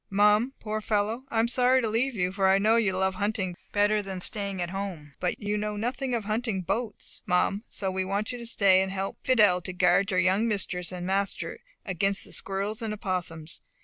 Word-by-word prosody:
Mum, 210 +6 +3
poor 215 0 -3
fellow, 215 +4 -1
I 230 - -3
am 225 - +3
sorry 250 +1 +4
to 235 - 0
leave 235 +4 0
you; 180 -2 0
for 195 0 +1
I 190 - +5
know 215 +3 +3
you 215 -5 +2
love 190 0 +1
hunting 195 -2 -2 0.2
better 210 +1 +3
than 190 -2 -5
staying 200 0 -2
at 175 0 -2
home. 185 -7 -5
But 180 - -1
you 205 0 -1
know 210 0 -2
nothing 250 +3 -1
of 230 - -2
hunting 215 -1 -1
boats, 220 +5 -4
Mum; 180 +3 +2
so 190 -2 -3
we 190 0 -1
want 200 +4 -2
you 245 - -6
to 235 - -7
stay 195 -4 +4
and 190 0 -1
help 195 0 -3
Fidelle 210 -8 +4
to 185 +2 -5
guard 180 +2 +3
your 185 -2 +2
young 190 +5 +3
mistress 185 -5 -1
and 180 -1 -5
master 195 +1 -1 0.3
against 195 +1 0
the - - -12
squirrels 200 +3 -2
and 215 -2 -2
opossums. 175 -5 -4
200 Hz, 215 wpm, -27 LUFS, 185-220 Hz, 0.3 s, I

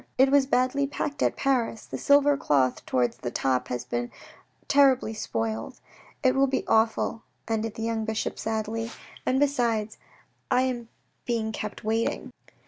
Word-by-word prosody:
It 265 +1 +5
was 280 -1 +4
badly 270 +2 +2
packed 290 0 -4
at - - +1
Paris. 240 -5 0
The - - -6
silver 285 0 +5
cloth 135 - +1
towards 125 -1 +1
the 120 - -4
top 125 0 0
has 125 0 -4
been 120 -1 -3 0.6
terribly 270 -5 +4
spoiled. 110 - -3 0.4
It 260 -1 +4
will 275 0 +3
look 265 - -1
awful," 225 0 +2 0.3
ended 225 -1 -2
the 225 - -5
young 225 -1 -1
bishop 220 0 -3
sadly, 225 +1 -2 0.2
" - - -19
And 260 +1 +2
besides, 235 -7 0 0.5
I 250 - +3
am 240 -3 -3 0.4
being 225 -2 0
kept 210 -1 -6
waiting." 225 +1 -1
225 Hz, 155 wpm, -26 LUFS, 215-265 Hz, 0.6 s, It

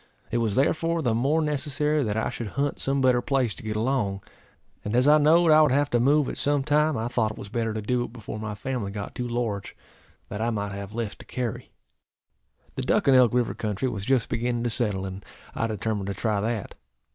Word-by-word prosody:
It 120 - +1
was 110 -4 0
therefore 165 +4 +1
the 120 -4 +2
more 140 +8 +2
necessary 150 0 0
that 105 -2 -1
I 110 - 0
should 115 - -5
hunt 140 0 0
some 135 0 +1
better 125 -2 +4
place 130 -6 0
to - - -7
get 110 -1 -4
along; 110 -4 -1 0.6
and 105 +3 -2
as 125 +3 +4
I 150 +1 +7
knowed 160 +3 +5
I 155 0 +7
would 150 -4 +4
have 145 +2 +2
to 120 - +3
move 140 +3 +3
at - - -5
some 145 -1 +1
time, 150 0 +2
I 110 +1 -2
thought 115 -3 0
it - - -15
was 100 - -8
better 115 0 -1
to 110 -1 -4
do 120 +3 0
it - - -11
before 110 -2 -7
my 110 -1 -4
family 120 -1 -3
got 100 0 -6
too 125 - -3
large, 115 -5 -3 0.5
that 105 - -5
I 115 - +1
might 105 -3 -2
have 100 +1 -7
less 115 -3 -3
to - - -13
carry. 125 -3 -4 1.0
The - - -4
Duck - - +1
and 135 - +6
Elk 125 -3 +6
river 125 -1 +1
country 105 +4 -2
was 105 -5 -4
just 130 +1 +2
beginning 120 0 -1
to 120 - -1
settle, 105 -5 -1
and 95 +1 -7 0.3
I 115 - -1
determined 105 -2 -2
to 100 - -3
try 105 0 0
that. 110 -1 -3
120 Hz, 230 wpm, -26 LUFS, 110-135 Hz, 1.0 s, I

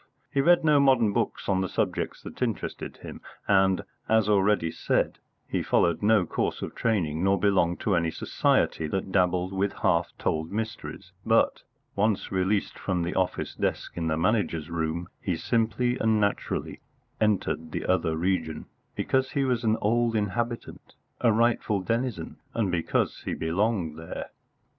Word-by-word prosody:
He 140 - +3
read 175 +4 +5
no 150 -2 +5
modern 130 -7 +4
books - - -1
on 95 -1 +2
the 95 - -2
subjects - - -2
that - - -10
interested - - -3
him, - - -8 0.3
and, 95 -1 +3 0.3
as 110 -2 +4
already 100 -4 +3
said, - - 0 0.3
he - - -1
followed 85 -2 +2
no 105 -3 +4
course - - -2
of - - -5
training, 85 -8 0
nor 95 +1 +3
belonged 95 -4 +2
to 100 - +1
any 85 -1 +1
society 80 0 +1
that 95 +4 -3
dabbled 90 0 +1
with 95 +1 0
half 85 0 +2
told 80 +1 -1
mysteries; 110 +2 -5
but, - - +2 0.3
once 105 0 0
released 95 +2 0
from 90 -3 -1
the 85 - -2
office 95 -1 -1
desk - - -2
in 85 -1 -2
the 80 -1 0
Manager's 85 -4 0
room, 85 +1 -2
he 90 - -1
simply 115 +7 0
and 110 -1 +2
naturally 100 -1 -2 0.4
entered 95 -6 0
the - - -3
other 80 -3 +1
region, 80 -3 -1 0.3
because 130 0 0
he 140 - +1
was 125 -2 0
an 110 0 +2
old 115 +2 +2
inhabitant, 115 +3 -3 0.2
a 115 - +4
rightful 115 -2 +2
denizen, 115 -2 -2 0.2
and 105 -5 +1
because 85 -2 0
he - - -2
belonged 85 -2 -1
there. 80 - -7
100 Hz, 155 wpm, -27 LUFS, 85-110 Hz, 0.4 s, read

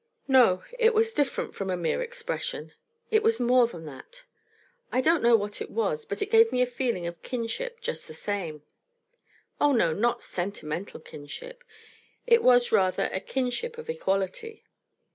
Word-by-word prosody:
No; 245 -9 +5 0.2
it 455 -1 +4
was 450 +1 +2
different 290 -7 -1
from 195 -1 -4
a 180 - 0
mere 175 - -1
expression; 485 +1 -4 0.4
it 435 0 +4
was 450 +1 +2
more 245 0 +4
than 170 -8 -10
that. 470 - -10 0.7
I 255 - +1
don't 325 +5 +3
know 235 0 +6
what 205 -1 -2
it - - -5
was, 460 0 -1
but 430 - -3
it 410 - -6
gave 455 0 +6
me 250 - 0
a - - +2
feeling 240 -7 -2
of 170 -1 -6
kinship 260 - -4
just - - -4
the - - -10
same. 170 -8 -4 1.0
Oh, 290 -1 +4
no, 170 -10 +3
not 235 +7 0
sentimental 175 -2 -5
kinship. - - -10 0.6
It 470 -1 +5
was, 245 -1 +5
rather, 185 -1 +2
a 190 - -1
kinship 265 - -2
of 470 0 -5
equality. 440 - -3
250 Hz, 165 wpm, -27 LUFS, -, 1.0 s, know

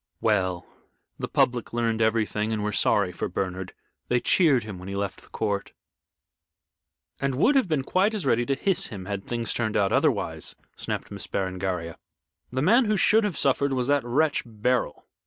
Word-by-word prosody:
"Well, 95 -5 +1 0.5
the - - -3
public 120 -2 +1
learned 115 -1 0
everything 110 -1 +1
and 110 -2 -1
were 105 - -1
sorry 100 -2 +2
for - - -4
Bernard. 95 0 -4 0.3
They 125 - +2
cheered 140 - +3
him 105 -4 -7
when 90 - -9
he 100 - -4
left 100 -1 -3
the - - -20
court." 100 -2 -2 1.5
"And 135 -1 -1
would 225 - +4
have 270 -7 +3
been 150 -4 +1
quite 195 +9 +1
as 195 -8 -3
ready 120 -2 +3
to 135 - +1
hiss 195 +5 +1
him 95 -4 -8
had 100 0 -5
things 115 -1 -1
turned 110 -2 -1
out 100 -2 +2
otherwise," - - 0 0.2
snapped - - -4
Miss - - -6
Berengaria. 95 -3 -3 0.5
"The 130 +2 -1
man 235 +9 +5
who 210 -1 +1
should 220 +3 +4
have 205 -5 -2
suffered 140 0 +2
was 125 -2 0
that 145 -3 +3
wretch 145 +5 +1
Beryl." 115 -5 -1
115 Hz, 180 wpm, -26 LUFS, 100-140 Hz, 1.5 s, man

